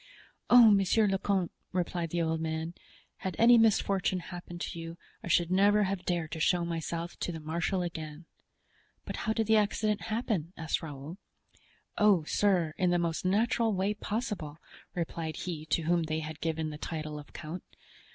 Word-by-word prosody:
"Oh, 240 -3 +9
monsieur 200 +2 +4
le 195 -1 +1
comte," 190 -4 0 0.2
replied 175 -2 -1
the 170 +1 0
old 160 0 -1
man, 160 +1 -3 0.4
"had 190 -3 -4
any 240 +1 +7
misfortune 200 -4 +2
happened 175 0 -8
to 170 - -4
you, 165 +1 -7 0.3
I - - -6
should 175 0 +2
never 205 +3 +5
have 190 -1 -2
dared 170 -3 -1
to 160 - -4
show 175 +2 +2
myself 170 0 -4
to - - -2
the 165 - -6
marshal 170 +4 -1
again." 160 -2 -6 0.8
"But - - -4
how 220 - -1
did 225 0 0
the 220 +1 +4
accident 210 0 +1
happen?" 215 -7 -1
asked 160 -1 -1
Raoul. 155 +3 -8 0.8
"Oh, 205 -6 +5
sir, 175 -2 +2
in 180 -1 +3
the 175 - +3
most 170 0 -1
natural 220 +2 +2
way 195 +3 +1
possible," 205 -8 -4 0.4
replied 165 -2 -3
he 160 -4 -5
to 160 +1 +1
whom 170 +2 +2
they 160 0 -2
had 155 -1 -7
given 160 -1 -1
the 150 - -8
title 155 -2 -4
of 145 - -13
count. 170 +3 -7
175 Hz, 175 wpm, -30 LUFS, 160-200 Hz, 0.8 s, Oh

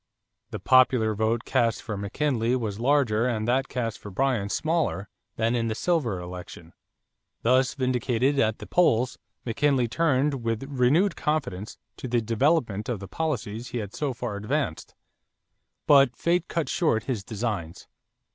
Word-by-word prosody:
The - - -5
popular 125 -4 +4
vote 110 +3 0
cast 120 -4 +1
for 110 - -4
McKinley 115 +4 0
was 110 -5 -3
larger 125 -3 +2
and 110 -3 -1
that 130 +2 +1
cast 115 -5 -3
for 105 - -9
Bryan 115 -1 0
smaller 155 - -1 0.3
than 115 +1 +1
in 115 -1 0
the 110 - -2
silver 130 - 0
election. 90 -2 -9 0.7
Thus 130 +2 +3
vindicated 130 +1 +1
at 110 -2 +2
the - - -9
polls, 130 -8 +2 0.3
McKinley 125 +1 +1
turned 140 -1 +1
with 115 +1 -1
renewed 145 +8 +2
confidence 125 -10 -2 0.2
to - - -6
the 120 0 +1
development 115 -2 0
of 120 -5 -2
the 100 - -8
policies 120 - -3
he 120 - -5
had 105 -3 -5
so 145 -3 -2
far 120 -4 -4
advanced. 105 - -3 0.9
But 140 -4 +5
fate 175 +4 0
cut 165 -2 -2
short 115 - +1
his 120 -7 -3
designs. 105 -7 -4
120 Hz, 150 wpm, -26 LUFS, 110-135 Hz, 0.9 s, But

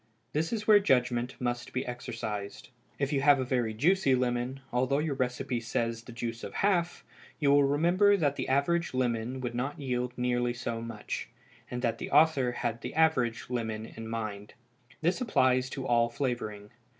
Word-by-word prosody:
This 155 +2 0
is 215 -2 -2
where 215 -1 +7
judgment 125 -7 +1
must 120 -1 -3
be 130 - -1
exercised. 110 -5 -5 0.3
If 140 +1 -1
you 135 - +2
have 145 -1 +6
a - - +1
very 125 -3 0
juicy 140 - +3
lemon, 125 +1 -1
although 130 +3 +2
your 150 0 0
recipe 125 -1 -2
says 115 0 -2
the 120 - -12
juice 115 -1 -5
of - - -7
half, 175 -4 +1 0.3
you 145 -3 +3
will 145 0 +6
remember 175 +8 +4
that 145 -5 +1
the - - -3
average 140 +4 +1
lemon 125 0 -1
would 125 -1 -3
not 130 +5 -3
yield 125 -2 -2
nearly 120 0 0
so 115 -1 -4
much, 115 0 -5 0.4
and 125 0 -4
that 115 -1 0
the - - -5
author 140 -6 +4
had 120 -1 -3
the - - -6
average 130 -8 +2
lemon 110 -3 -2
in 115 0 -7
mind. 110 -2 -5 0.5
This 175 +9 +1
applies 130 - +2
to 135 0 -5
all 120 -1 +3
flavoring. 115 -5 -3
125 Hz, 175 wpm, -29 LUFS, 120-140 Hz, 0.5 s, where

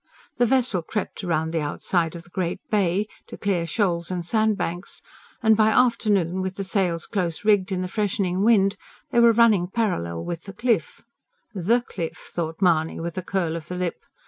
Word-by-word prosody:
The 240 0 +3
vessel 250 -7 +2
crept 205 +6 -4
round 160 -3 -1
the 165 - 0
outside 165 +3 -1
of 170 - -8
the 175 - -17
great 175 -2 -2
Bay, 200 0 +2 0.2
to - - -9
clear 180 -5 0
shoals 170 -2 0
and 180 -2 -3
sandbanks, 210 -4 -1 0.4
and, 220 -1 +6
by 215 0 +4
afternoon, 210 -7 +2
with 190 0 -3
the 195 - -3
sails 185 -4 0
close 185 -3 -2
rigged 205 -2 +3
in 185 -1 -1
the - - -2
freshening 190 -2 -1
wind, 200 -2 +4 0.3
they 235 - +3
were 235 0 +7
running 220 -6 +4
parallel 85 - -2
with 170 -1 -5
the 195 - -8
Cliff 220 - -1 0.5
"THE 215 +6 +2
Cliff!" 170 -8 -5
thought 165 +2 -3
Mahony 160 -3 +2
with 170 +1 -4
a - - -3
curl 175 -3 -1
of 165 -1 -6
the 180 - -5
lip. 180 -1 -3
185 Hz, 185 wpm, -24 LUFS, 170-215 Hz, 0.5 s, were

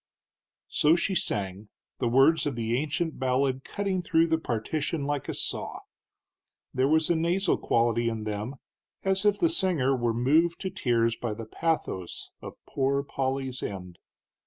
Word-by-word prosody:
So 155 +2 +4
she 190 +3 0
sang, 100 - -2 0.3
the 125 - +1
words 135 +7 +4
of 140 - -2
the 115 0 -1
ancient 155 +4 -1
ballad 130 0 +1
cutting 195 -2 -2
through 165 -1 +3
the 160 0 +2
partition 140 +5 -2
like 145 -1 -2
a - - -1
saw. - - -3 0.9
There 130 +1 +2
was 160 +2 +3
a - - +3
nasal 175 +4 +2
quality 115 0 +2
in 110 -1 -4
them, 105 +5 -4 0.5
as 190 +1 +1
if 205 -1 +4
the 335 - +3
singer 175 - +2
were 120 -2 0
moved 155 +8 +3
to 190 - -3
tears 115 - +1
by 115 -3 -3
the 115 +1 -7
pathos 110 - -3
of - - -8
Poor 140 +1 0
Polly's 135 -2 -2
end. 90 -3 -6
135 Hz, 160 wpm, -28 LUFS, 115-165 Hz, 0.9 s, So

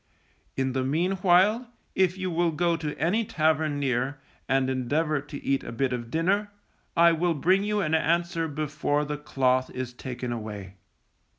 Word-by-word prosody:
In 130 -1 0
the 130 0 0
meanwhile, 185 - +2 0.3
if 190 -1 +2
you 185 -1 -2
will 170 +1 +2
go 170 +2 +1
to 155 -3 -4
any 205 +8 +1
tavern 155 -5 +1
near, 135 +1 -1 0.3
and 135 0 +2
endeavour 140 +4 0
to 145 0 -9
eat 135 0 0
a - - -6
bit 130 +2 -1
of 120 -2 -4
dinner, 195 - +1 0.5
I 170 0 +7
will 170 +1 +1
bring 185 +7 +3
you 210 0 0
an 155 -4 -1
answer 165 +1 +1
before 150 0 -1
the 150 0 -4
cloth 130 -3 +1
is 130 -1 -5
taken 125 0 -5
away. 105 -4 -6
150 Hz, 165 wpm, -26 LUFS, 130-175 Hz, 0.5 s, I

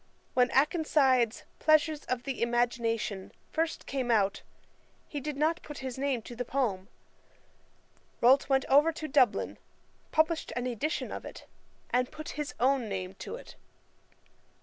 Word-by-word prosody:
When 250 -1 +4
Akenside's 270 -5 +3 0.2
Pleasures 310 0 +3
of 250 -1 -2
the 270 -2 -4
Imagination 235 -4 0 0.2
first 325 +1 -1
came 260 -3 -2
out, 205 -4 +2 0.7
he 290 - -4
did 295 0 -4
not 320 +4 +1
put 295 -1 -9
his 255 -2 -4
name 270 -4 0
to 240 - -9
the 245 - -2
poem. 230 -8 -1 1.3
Rolt 265 +4 +5
went 270 -1 +3
over 290 +4 +5
to 310 -1 -5
Dublin, 265 -4 +2 0.5
published 320 +1 +1
an 245 0 -2
edition 255 +6 -2
of - - -5
it, - - -10 0.5
and 250 0 +2
put 310 0 -7
his 295 -1 -5
own 255 -3 +2
name 185 -1 -4
to - - -6
it. - - -11
265 Hz, 145 wpm, -30 LUFS, 240-300 Hz, 1.3 s, Rolt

